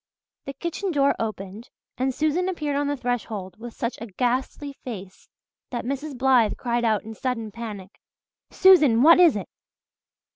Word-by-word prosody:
The 275 Hz, -, -5 dB
kitchen 340 Hz, +7 st, -4 dB
door 280 Hz, -3 st, +2 dB
opened 215 Hz, +1 st, -5 dB, 0.3 s
and 260 Hz, +1 st, 0 dB
Susan 310 Hz, +7 st, 0 dB
appeared 300 Hz, -6 st, -2 dB
on 285 Hz, 0 st, 0 dB
the 290 Hz, 0 st, -1 dB
threshold 220 Hz, -6 st, -4 dB
with 235 Hz, 0 st, -9 dB
such 235 Hz, +1 st, -3 dB
a 230 Hz, -, -5 dB
ghastly 255 Hz, +7 st, -2 dB
face 195 Hz, -6 st, -9 dB, 0.4 s
that 240 Hz, -2 st, -4 dB
Mrs. 275 Hz, +1 st, -4 dB
Blythe 250 Hz, -4 st, +3 dB
cried 240 Hz, -1 st, -1 dB
out 220 Hz, -3 st, +1 dB
in 225 Hz, -, -8 dB
sudden 230 Hz, -2 st, -3 dB
panic. 210 Hz, -4 st, -8 dB, 0.5 s
"Susan, 300 Hz, -11 st, +5 dB
what 335 Hz, +3 st, +8 dB
is 340 Hz, -8 st, +6 dB
it?" 200 Hz, -, -4 dB
245 Hz, 155 wpm, -24 LUFS, 225-285 Hz, 0.5 s, what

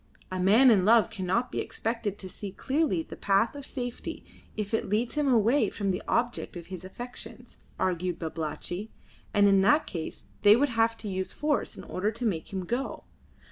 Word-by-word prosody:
A 185 Hz, -, -2 dB
man 220 Hz, +8 st, +6 dB
in 195 Hz, -5 st, +4 dB
love 225 Hz, +2 st, +5 dB
cannot 215 Hz, +4 st, -1 dB
be -, -, -2 dB
expected 225 Hz, -3 st, -2 dB
to 190 Hz, -, -7 dB
see 195 Hz, +1 st, -7 dB
clearly 265 Hz, -, 0 dB
the -, -, -9 dB
path 200 Hz, +3 st, +2 dB
of 285 Hz, -2 st, -7 dB
safety 245 Hz, -2 st, -5 dB, 0.3 s
if 210 Hz, 0 st, -3 dB
it 225 Hz, -, 0 dB
leads 220 Hz, +4 st, 0 dB
him 295 Hz, -1 st, +1 dB
away 240 Hz, +2 st, +4 dB
from 200 Hz, -2 st, -1 dB
the 185 Hz, +3 st, -2 dB
object 240 Hz, -6 st, -1 dB
of 170 Hz, -, -8 dB
his 180 Hz, -1 st, -6 dB
affections, 245 Hz, +6 st, -9 dB, 0.2 s
argued 180 Hz, -1 st, 0 dB
Babalatchi, 170 Hz, +5 st, -4 dB, 0.4 s
and 205 Hz, 0 st, +5 dB
in 195 Hz, -1 st, +5 dB
that 295 Hz, +11 st, +4 dB
case 165 Hz, -3 st, -6 dB, 0.2 s
they 205 Hz, 0 st, +8 dB
would 285 Hz, +4 st, +2 dB
have 230 Hz, -1 st, +2 dB
to 220 Hz, -, -7 dB
use 190 Hz, -1 st, -3 dB
force 295 Hz, -1 st, -1 dB
in -, -, -8 dB
order 195 Hz, +3 st, -1 dB
to 235 Hz, +3 st, -4 dB
make 175 Hz, -8 st, -2 dB
him 190 Hz, -2 st, -3 dB
go. 245 Hz, +7 st, -3 dB
210 Hz, 190 wpm, -28 LUFS, 185-240 Hz, 0.4 s, they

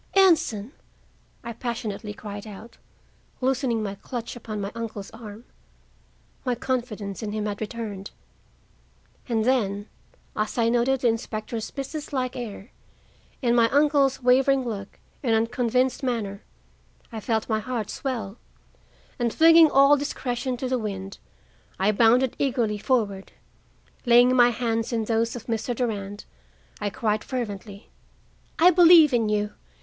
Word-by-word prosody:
"Anson!" 320 Hz, -, +3 dB, 0.7 s
I 235 Hz, -, -6 dB
passionately 225 Hz, -3 st, -4 dB
cried 205 Hz, 0 st, -8 dB
out, 215 Hz, +3 st, -11 dB, 0.6 s
loosening 255 Hz, -3 st, 0 dB
my 200 Hz, -2 st, -3 dB
clutch 235 Hz, +4 st, -6 dB
upon 220 Hz, -3 st, -6 dB
my 200 Hz, 0 st, -4 dB
uncle's 225 Hz, -3 st, -6 dB
arm. 225 Hz, -1 st, -10 dB, 1.0 s
My 250 Hz, -2 st, 0 dB
confidence 230 Hz, -6 st, -3 dB
in 210 Hz, -2 st, -4 dB
him 215 Hz, -1 st, -2 dB
had 205 Hz, 0 st, -4 dB
returned. 210 Hz, -3 st, -5 dB, 1.2 s
And 225 Hz, -2 st, +1 dB
then, 205 Hz, -5 st, 0 dB, 0.5 s
as 215 Hz, +3 st, -2 dB
I 230 Hz, -1 st, +3 dB
noted 245 Hz, +2 st, +1 dB
the 245 Hz, -, +3 dB
inspector's 225 Hz, 0 st, -3 dB
businesslike 275 Hz, -2 st, -4 dB
air, 230 Hz, -2 st, -7 dB, 0.7 s
and 240 Hz, -1 st, +3 dB
my 230 Hz, -1 st, +4 dB
uncle's 285 Hz, -2 st, +2 dB
wavering 265 Hz, +1 st, +4 dB
look 200 Hz, -3 st, -6 dB, 0.2 s
and 230 Hz, -5 st, +2 dB
unconvinced 245 Hz, +4 st, +1 dB
manner, 225 Hz, -6 st, -2 dB, 0.7 s
I 225 Hz, -, -5 dB
felt 220 Hz, 0 st, -1 dB
my 220 Hz, -2 st, 0 dB
heart 230 Hz, -2 st, -4 dB
swell, 235 Hz, -6 st, -4 dB, 0.8 s
and, 235 Hz, -1 st, +1 dB
flinging 325 Hz, +2 st, +7 dB
all 275 Hz, +1 st, +6 dB
discretion 255 Hz, -2 st, -3 dB
to 255 Hz, -, -3 dB
the 255 Hz, 0 st, 0 dB
wind, 195 Hz, -3 st, -5 dB, 0.6 s
I 195 Hz, +3 st, +2 dB
bounded 235 Hz, +4 st, +3 dB
eagerly 240 Hz, -6 st, 0 dB
forward. 205 Hz, -5 st, -1 dB, 0.7 s
Laying 245 Hz, +1 st, +6 dB
my 245 Hz, -1 st, +6 dB
hands 230 Hz, -1 st, -1 dB
in 225 Hz, -2 st, -1 dB
those 230 Hz, +1 st, 0 dB
of 240 Hz, -, -8 dB
Mr. 230 Hz, +1 st, -2 dB
Durand, 205 Hz, -4 st, -3 dB, 0.5 s
I 205 Hz, -, -1 dB
cried 215 Hz, -2 st, -1 dB
fervently: 205 Hz, -5 st, -6 dB, 0.7 s
"I 350 Hz, +3 st, +7 dB
believe 335 Hz, -4 st, +7 dB
in 225 Hz, -3 st, +2 dB
you. 210 Hz, 0 st, -1 dB
230 Hz, 135 wpm, -25 LUFS, 210-255 Hz, 1.2 s, flinging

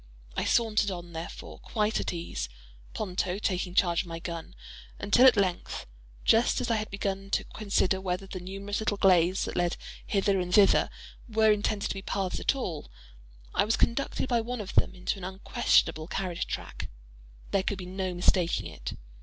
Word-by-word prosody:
I -, -, 0 dB
sauntered 220 Hz, -3 st, +3 dB
on, 175 Hz, -2 st, -6 dB
therefore, 165 Hz, +1 st, -7 dB
quite 215 Hz, -1 st, 0 dB
at -, -, -1 dB
ease—Ponto -, -, -4 dB
taking 185 Hz, -3 st, -1 dB
charge 175 Hz, -3 st, +3 dB
of 185 Hz, -, -10 dB
my 165 Hz, 0 st, -5 dB
gun—until 180 Hz, +7 st, 0 dB
at 250 Hz, -, +6 dB
length, 185 Hz, -3 st, -1 dB, 0.4 s
just 225 Hz, +2 st, +4 dB
as 245 Hz, -2 st, -1 dB
I 225 Hz, -, +3 dB
had 215 Hz, 0 st, -3 dB
begun 195 Hz, 0 st, -3 dB
to -, -, +1 dB
consider 195 Hz, -3 st, 0 dB
whether 185 Hz, +1 st, -2 dB
the 190 Hz, -1 st, -6 dB
numerous 195 Hz, +3 st, -4 dB
little 215 Hz, -2 st, 0 dB
glades 185 Hz, -1 st, +4 dB
that -, -, -5 dB
led 175 Hz, -1 st, +1 dB, 0.3 s
hither 195 Hz, -1 st, +2 dB
and 180 Hz, -1 st, -2 dB
thither, 200 Hz, 0 st, +5 dB, 0.4 s
were 220 Hz, -1 st, +4 dB
intended 210 Hz, 0 st, 0 dB
to -, -, -1 dB
be 195 Hz, -, -6 dB
paths 195 Hz, -2 st, -2 dB
at -, -, +2 dB
all, 175 Hz, -, -4 dB, 0.6 s
I -, -, +4 dB
was 220 Hz, +2 st, +1 dB
conducted 260 Hz, +2 st, 0 dB
by 240 Hz, -2 st, +2 dB
one 245 Hz, +2 st, -4 dB
of 205 Hz, -2 st, -6 dB
them 185 Hz, -, +3 dB
into 185 Hz, +2 st, -2 dB
an -, -, -10 dB
unquestionable 185 Hz, -4 st, +1 dB
carriage 180 Hz, -2 st, -2 dB
track. -, -, -5 dB, 0.6 s
There 195 Hz, -, +3 dB
could 195 Hz, +1 st, -2 dB
be 180 Hz, -, -6 dB
no 185 Hz, 0 st, -3 dB
mistaking 175 Hz, -1 st, +2 dB
it. -, -, -6 dB
195 Hz, 175 wpm, -29 LUFS, 180-210 Hz, 0.6 s, at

